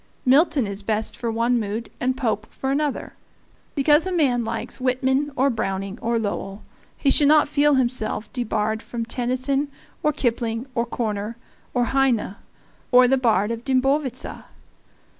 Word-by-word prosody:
Milton 275 0 +4
is 200 0 -3
best 215 +1 -1
for 235 -2 -3
one 235 +2 +1
mood 215 +2 -4
and 255 +1 0
Pope 220 -5 -1
for 265 - -3
another. 290 0 -1 0.6
Because 295 +4 +4
a - - -2
man 270 -9 +2
likes 230 +3 -4
Whitman 265 +3 +1
or 275 +1 +2
Browning 195 -1 -3
or 235 0 0
Lowell 205 -2 -4 0.3
he 275 - +2
should 290 - +4
not 305 +1 +5
feel 295 0 +3
himself 240 -4 0
debarred 220 -3 -1
from 230 -1 -5
Tennyson 255 +4 -1 0.3
or 300 - +2
Kipling 235 -4 -1
or 235 -1 -1
Korner 215 -2 -3 0.4
or 245 -1 +2
Heine 255 -6 +1 0.6
or 250 0 +7
the 265 +1 +3
Bard 220 -4 +2
of 230 0 -4
the 270 - -1
Dimbovitza. 265 -1 -1
245 Hz, 155 wpm, -23 LUFS, 225-270 Hz, 0.6 s, or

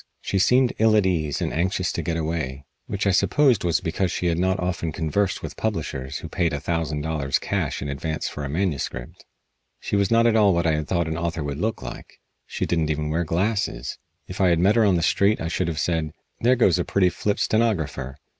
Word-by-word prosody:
She 95 - -1
seemed 125 +5 +4
ill 110 0 +5
at 105 -3 +4
ease 80 -6 0
and - - -2
anxious 90 +2 0
to - - -3
get 85 -2 -2
away, 75 -4 -3 0.2
which 100 0 -2
I 100 - +4
supposed 125 +3 +3
was 85 -2 +1
because 85 +2 -1
she 90 - -3
had 85 -1 +1
not 95 +1 +1
often 90 -2 -2
conversed 90 +6 -1
with - - -6
publishers 65 +1 -3
who - - -7
paid 85 -1 0
a 75 - -2
thousand 80 -1 -2
dollars 75 -3 0
cash - - -2
in - - -4
advance 80 +3 -3
for 75 - -6
a 70 - -4
manuscript. 75 -7 -3 0.6
She - - -3
was 100 -1 +2
not 115 0 +4
at 115 -1 +4
all 105 -4 +5
what 85 0 +1
I 80 - +3
had 75 -1 -2
thought 85 -3 0
an 80 +1 -3
author 85 -2 -2
would 70 0 -4
look 110 -9 -2
like. - - -9 0.3
She - - -2
didn't 80 -3 0
even 75 0 -1
wear 85 +2 +1
glasses. 90 - -1 0.3
If 90 - -5
I 95 - +5
had 85 - +3
met 95 +6 +3
her 115 -2 +4
on 100 -3 +4
the 85 - 0
street 100 +5 +3
I 80 - -3
should 90 +1 -1
have 80 -2 -2
said: 80 -3 0 0.3
"There 125 +2 +4
goes 95 -8 +3
a - - +1
pretty 95 0 +2
flip 100 +4 -1
stenographer." 80 - 0
85 Hz, 230 wpm, -24 LUFS, 80-100 Hz, 0.6 s, ill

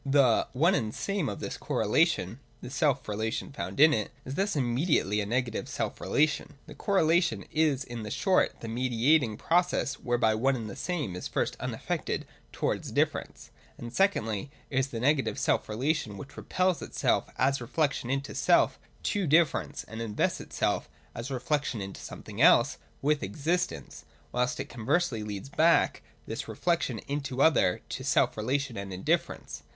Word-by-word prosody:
136.J 140 +1 +1
(/3) 125 -5 +4
The - - -11
one 170 +5 +5
and 110 - -1
same 195 - -1
of 100 - -5
this - - -5
correlation 100 +8 +1 0.2
(the 125 - -8
self 140 -2 +1
relation 110 +4 -2
found 140 - -5
in 155 +1 +8
it) 105 -5 -1 0.2
is 130 - -5
thus 195 +5 0
immediately 120 - +1
a 100 - -3
negative 120 0 -1
self - - -3
relation. 150 0 +1
The - - -10
correlation 165 - +2
is 150 -4 +2
in 115 -4 -6
short 190 - +1
the 115 - -6
mediating 120 +1 +2
process 175 -5 +1
whereby 120 -3 +2
one 130 +5 +2
and 115 -3 -4
the 100 - -7
same 155 - -3
is 90 - -4
first - - -1
unaffected - - -3 0.3
towards - - -2
difference, - - -1 0.3
and 120 0 -8
secondly 125 - +1 0.2
is 130 0 +1
the 120 -3 -5
negative 135 +2 +2
self - - +1
relation, 115 -2 -1
which 135 - -10
repels 185 -2 0
itself - - 0
as 135 0 +2
reflection 135 0 -1
into 135 +1 -2
self - - +3 0.2
to 200 -5 0
differ 160 +2 +4
ence, - - -8
and 110 +2 -8
invests 110 -2 -1
itself - - -1 0.2
(as 115 +3 -5
reflection 135 -1 -1
into 95 -1 -6
something - - -7
else) - - +5 0.2
with 150 +1 +2
existence, 155 - -2 0.3
whilst 125 0 0
it - - -2
conversely 125 +2 0
leads 105 +3 -6
back 165 +4 +3 0.2
this - - -5
re - - -6
flection 170 -10 0
into 140 -2 -3
other 145 - +4
to - - -5
self - - +2
relation 130 +4 -1
and 100 0 -5
indifference. 95 0 -2
130 Hz, 165 wpm, -29 LUFS, 110-155 Hz, 0.3 s, in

